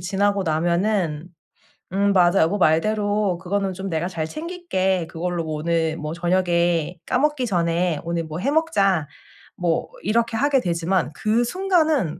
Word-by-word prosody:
지나고 200 +2 0
나면은 170 0 0 0.7
"음 200 +1 +2
맞아. 175 -2 +4
여보 165 +6 +2
말대로 205 +3 +1
그거는 195 +2 -2
좀 190 +1 -5
내가 165 +1 -1
잘 160 -4 -3
챙길게. 190 - -2
그걸로 170 0 -3
오늘 160 +1 -1
뭐 155 0 -5
저녁에 175 -1 +1
까먹기 270 0 +1
전에 170 -4 0
오늘 170 0 -2
뭐 155 +1 -6
해 270 +10 0
먹자." 200 - +2 0.5
뭐 170 -2 -1
이렇게 230 +3 +1
하게 280 +2 +3
되지만 170 - 0
그 220 +2 +1
순간은 320 - +1
185 Hz, 280 characters per minute, -22 LUFS, 170-215 Hz, 0.7 s, 맞아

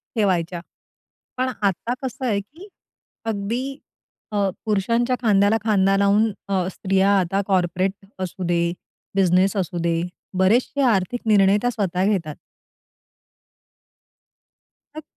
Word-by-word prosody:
ठेवायच्या. 180 -5 0 0.8
पण 255 0 0
आता 200 +5 0
कसं 260 0 -4
आहे 205 -4 +1
की 325 - -15 0.6
अगदी 230 +6 -3 0.5
अ, 200 -2 +1 0.2
पुरुषांच्या 230 +4 +1
खांद्याला 205 -1 +3
खांदा 195 -3 +3
लावून 205 +2 +3 0.2
अ, 185 -2 0
स्त्रिया 195 +2 +1
आता 195 +2 0
कॉर्पोरेट 185 0 +1 0.3
असू 185 0 -4
दे, 170 0 +1 0.4
बिझनेस 185 +1 +3
असू 180 -1 -2
दे, 165 -1 +1 0.4
बरेचसे 240 +9 +2
आर्थिक 200 +5 -1
निर्णय 200 -2 +5
त्या 245 - +1
स्वतः 190 -4 -1
घेतात. 165 -7 -2 2.6
मग 310 - -6
195 Hz, 110 wpm, -22 LUFS, 185-225 Hz, 2.6 s, निर्णय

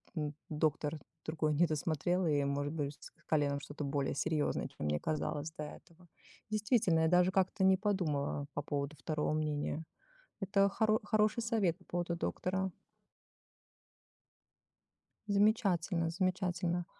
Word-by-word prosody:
м, 150 -2 -2 0.2
доктор 150 0 0 0.3
другой 155 -1 0
недосмотрел 165 +3 +1
и, 145 -3 +2
может 145 +1 -1
быть, 145 -2 -2
с - - -11 0.2
коленом 145 -2 +2
что-то 145 +1 -6
более 140 -1 -1
серьёзное, 150 +1 0
чем - - -6
мне 75 0 +1
казалось 155 0 -2
до 150 - -3
этого. 170 +3 -13 0.4
Действительно, 210 -6 +2
я 160 - +4
даже 180 +2 +4
как-то 190 +1 +1
не 190 0 +6
подумала 160 -9 0
по 145 - -2
поводу 145 0 -3
второго 150 +2 -1
мнения. 155 0 -1 0.6
Это 195 +1 +3
хоро 215 +1 +2
хороший 215 +2 +2
совет 215 -7 +1
по 185 - -22
поводу 175 -1 -2
доктора. 190 +2 -1 2.6
Замечательно, 200 -5 +2
замечательно. 180 -1 0
165 Hz, 125 wpm, -34 LUFS, 150-190 Hz, 2.6 s, не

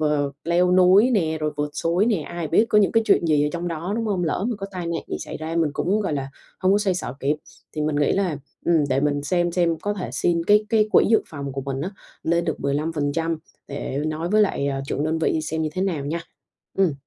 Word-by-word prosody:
ờ, 150 -2 +1
leo 175 +2 +3
núi 185 +6 +6
nè 160 -9 +1
rồi 155 0 0
vượt 150 0 -2
suối 175 +5 +1
nè, 230 -3 +3
ai 170 +1 -5
biết 190 +8 +4
có 210 - +4
những 205 - +3
cái 225 - +4
chuyện - - +4
gì 150 -2 +3
ở - - +1
trong 175 0 -3
đó, 170 +3 -4
đúng 230 -1 -1
không? 190 -4 0
Lỡ 165 +4 -1
mà 240 - -1
có 195 - -4
tai 180 -3 -5
nạn 170 0 -2
gì - - -2
xảy - - -6
ra 160 +1 -4
mình 165 -3 +2
cũng, 200 +7 0
gọi 195 - -1
là, 135 -2 -2 0.3
hông 185 0 +3
có 200 - +4
xoay 200 -3 +1
xở 175 -7 -4
kịp. 145 +3 +1 0.4
Thì 155 - -3
mình 150 -1 0
nghĩ 145 -1 +2
là, 185 -6 0 0.3
ừm, 165 -3 +4
để 135 0 +1
mình 145 0 0
xem 175 +3 0
xem 170 -2 +2
có 205 0 -1
thể 185 - -5
xin 170 -1 +1
cái 210 +3 +4
cái 215 -2 +3
quỹ - - +6
dự 225 - +4
phòng 140 -3 -6
của 135 - -3
mình 135 0 -4
á, 175 +6 -3 0.3
lên 170 +1 +1
được 160 - -2
15% 155 +2 -1 0.3
để 140 -1 -4
nói 155 +2 -2
với 215 +3 +4
lại, 190 -8 0
ờ, 135 -1 -2
trưởng 145 - -2
đơn 160 +1 0
vị 160 0 +1
xem 160 +1 -2
như 155 - 0
thế 185 - -2
nào 170 -8 -1
nha. 165 +4 -2 0.6
Ừm. 190 -5 +4
165 Hz, 260 wpm, -23 LUFS, 150-185 Hz, 0.6 s, núi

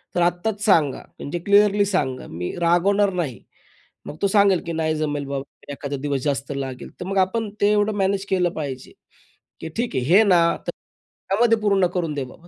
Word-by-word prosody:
तर 175 - +2
आत्ताच 175 +5 0
सांगा. 155 -9 +3 0.2
म्हणजे 160 +5 -4
क्लिअरली 205 0 +4
सांगा. 145 -10 -2
मी 90 +2 -4
रागवणार 195 +4 +3
नाही. 160 -9 -3 0.6
मग 150 - -8
तो 200 - +3
सांगेल 200 -2 +4
की 170 - -4
"नाही 160 -1 0
जमेल 145 -2 -2
बाबा, 140 -1 -3 0.3
एखादा 140 0 -5
दिवस 140 -2 -1
जास्त 140 -1 -2
लागेल." 135 -2 -5
तर 180 - -5
मग 195 +1 -3
आपण 220 +3 -3
ते 205 +1 +4
एवढं 210 0 +2
मॅनेज 195 0 0
केलं 180 -2 +2
पाहिजे. 135 -4 -6 0.7
की 160 - -6
"ठीक 240 +1 -2
आहे, 125 - 0
हे 185 +10 +6
ना 185 -5 +4 0.3
तर - - 0 0.6
त्यामध्ये 225 +3 +3
पूर्ण 200 -3 +2
करून 165 -4 -1
दे 140 -2 -3
बाबा 165 +7 -15
175 Hz, 190 wpm, -22 LUFS, 145-200 Hz, 0.7 s, हे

